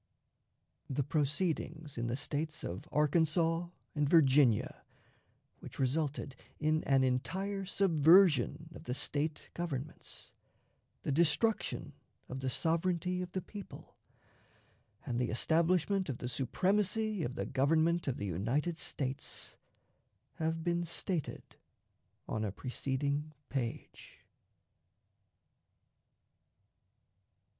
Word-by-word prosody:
The 135 Hz, +1 st, 0 dB
proceedings 155 Hz, +1 st, -1 dB
in 120 Hz, 0 st, -2 dB
the 120 Hz, +2 st, -1 dB
States 155 Hz, +3 st, -3 dB
of 90 Hz, +3 st, -5 dB
Arkansas 165 Hz, +3 st, +2 dB, 0.3 s
and 150 Hz, -2 st, +1 dB
Virginia, 135 Hz, -8 st, +4 dB, 0.8 s
which -, -, -10 dB
resulted 140 Hz, 0 st, -1 dB, 0.2 s
in 155 Hz, +1 st, +2 dB
an 135 Hz, -1 st, +4 dB
entire 190 Hz, +10 st, -1 dB
subversion 165 Hz, -4 st, +4 dB
of -, -, -11 dB
the 125 Hz, -, -2 dB
State 150 Hz, +2 st, -2 dB
Governments, 155 Hz, -4 st, -5 dB, 0.7 s
the -, -, -1 dB
destruction 170 Hz, +9 st, +1 dB, 0.4 s
of 130 Hz, -, -4 dB
the 130 Hz, 0 st, -1 dB
sovereignty 175 Hz, +5 st, 0 dB
of 180 Hz, -1 st, -6 dB
the 185 Hz, -, -2 dB
people, 205 Hz, -3 st, -10 dB, 1.1 s
and 120 Hz, -3 st, -1 dB
the 125 Hz, -, 0 dB
establishment 170 Hz, -, +2 dB
of 130 Hz, -, -2 dB
the 125 Hz, -, -4 dB
supremacy 195 Hz, -, +1 dB
of 125 Hz, -4 st, -2 dB
the -, -, -2 dB
Government 160 Hz, +5 st, +2 dB
of 130 Hz, -, 0 dB
the 100 Hz, -, -3 dB
United 120 Hz, -, -1 dB
States, 135 Hz, 0 st, -4 dB, 0.8 s
have 160 Hz, 0 st, -1 dB
been 175 Hz, 0 st, +1 dB
stated 170 Hz, -1 st, -3 dB, 0.8 s
on 110 Hz, -, -2 dB
a 105 Hz, -, -1 dB
preceding 140 Hz, +6 st, -2 dB, 0.2 s
page. 125 Hz, -4 st, -5 dB
155 Hz, 100 wpm, -33 LUFS, 135-170 Hz, 1.1 s, Virginia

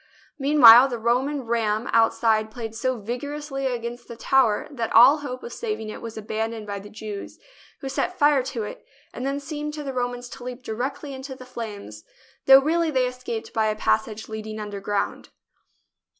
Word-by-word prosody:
Mean 290 Hz, +2 st, +1 dB
while 240 Hz, +2 st, +11 dB
the 245 Hz, -3 st, -4 dB
Roman 255 Hz, +5 st, 0 dB
ram 225 Hz, -1 st, -1 dB
outside 225 Hz, -1 st, +3 dB
played 225 Hz, 0 st, -7 dB
so 255 Hz, +3 st, -1 dB
vigorously 270 Hz, +5 st, -4 dB
against 240 Hz, -1 st, -5 dB
the 235 Hz, -, -8 dB
tower 235 Hz, -3 st, +2 dB
that 235 Hz, -5 st, -3 dB
all 250 Hz, +6 st, +8 dB
hope 255 Hz, -3 st, -6 dB
of 475 Hz, -, -7 dB
saving 425 Hz, -, -4 dB
it -, -, -8 dB
was 225 Hz, -1 st, -8 dB
abandoned 220 Hz, +1 st, -4 dB
by 200 Hz, -1 st, -5 dB
the 205 Hz, +1 st, -11 dB
Jews, 210 Hz, -2 st, -8 dB, 0.4 s
who 270 Hz, -, -5 dB
set 270 Hz, -, -2 dB
fire 290 Hz, -2 st, +4 dB
to 245 Hz, -4 st, -4 dB
it 210 Hz, -, -8 dB, 0.3 s
and 255 Hz, -, -4 dB
then 275 Hz, +1 st, -1 dB
seemed 300 Hz, +1 st, -5 dB
to 300 Hz, -, -6 dB
the 270 Hz, -2 st, -5 dB
Romans 245 Hz, -1 st, -3 dB
to 245 Hz, -, -10 dB
leap 250 Hz, 0 st, -7 dB
directly 265 Hz, +6 st, -4 dB
into 265 Hz, 0 st, -7 dB
the 255 Hz, -, -12 dB
flames, 210 Hz, -, -8 dB, 0.4 s
though 270 Hz, 0 st, +10 dB
really 330 Hz, +2 st, +1 dB
they 260 Hz, -4 st, +2 dB
escaped 250 Hz, -3 st, -5 dB
by 220 Hz, -1 st, +1 dB
a 215 Hz, -, 0 dB
passage 220 Hz, 0 st, -1 dB
leading 220 Hz, 0 st, -6 dB
underground. 205 Hz, -1 st, -3 dB
245 Hz, 180 wpm, -24 LUFS, 220-270 Hz, 0.4 s, while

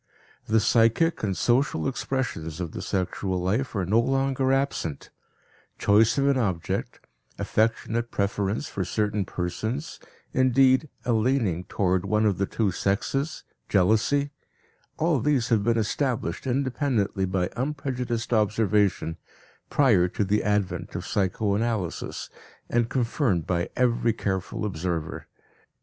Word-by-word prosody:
The 110 Hz, +1 st, +4 dB
psychic 115 Hz, +8 st, +3 dB
and 95 Hz, -3 st, -1 dB
social 120 Hz, -, +1 dB
expressions 120 Hz, -, -3 dB
of 85 Hz, -3 st, -4 dB
the -, -, -6 dB
sexual 95 Hz, 0 st, -2 dB
life 110 Hz, +9 st, -1 dB
are 95 Hz, -3 st, 0 dB
no 105 Hz, +6 st, +3 dB
longer 135 Hz, +1 st, +1 dB
absent; 135 Hz, -, -1 dB, 0.7 s
choice 105 Hz, +5 st, +4 dB
of 140 Hz, 0 st, +2 dB
an 140 Hz, -2 st, +3 dB
object, 95 Hz, -8 st, -2 dB, 0.3 s
affectionate 115 Hz, +1 st, 0 dB
preference 100 Hz, +5 st, -1 dB
for 95 Hz, -, -3 dB
certain 105 Hz, +1 st, -1 dB
persons, 110 Hz, -, -4 dB, 0.3 s
indeed, 130 Hz, +3 st, +4 dB, 0.2 s
a 120 Hz, -, +2 dB
leaning 110 Hz, -7 st, +1 dB
toward 95 Hz, -2 st, 0 dB
one 105 Hz, 0 st, +1 dB
of 100 Hz, -4 st, +1 dB
the 100 Hz, -, +1 dB
two 105 Hz, -4 st, 0 dB
sexes, 135 Hz, -, -1 dB, 0.3 s
jealousy 110 Hz, +9 st, +2 dB, 0.7 s
all 160 Hz, -3 st, +2 dB
these 125 Hz, -2 st, +1 dB
have 110 Hz, -4 st, +3 dB
been 115 Hz, +1 st, +2 dB
established 115 Hz, -, -1 dB
independently 125 Hz, -6 st, 0 dB
by 90 Hz, -1 st, -1 dB
unprejudiced 125 Hz, -4 st, -2 dB
observation, 105 Hz, -6 st, +1 dB, 0.5 s
prior 110 Hz, -11 st, +4 dB
to 95 Hz, -, -1 dB
the 105 Hz, +2 st, +1 dB
advent 105 Hz, -2 st, -1 dB
of -, -, -4 dB
psychoanalysis, 100 Hz, 0 st, -1 dB, 0.4 s
and 120 Hz, -1 st, +2 dB
confirmed 115 Hz, -, 0 dB
by 85 Hz, 0 st, -1 dB
every 120 Hz, -2 st, +2 dB
careful 95 Hz, -1 st, -3 dB
observer. 85 Hz, -4 st, -3 dB
110 Hz, 125 wpm, -26 LUFS, 95-130 Hz, 0.7 s, The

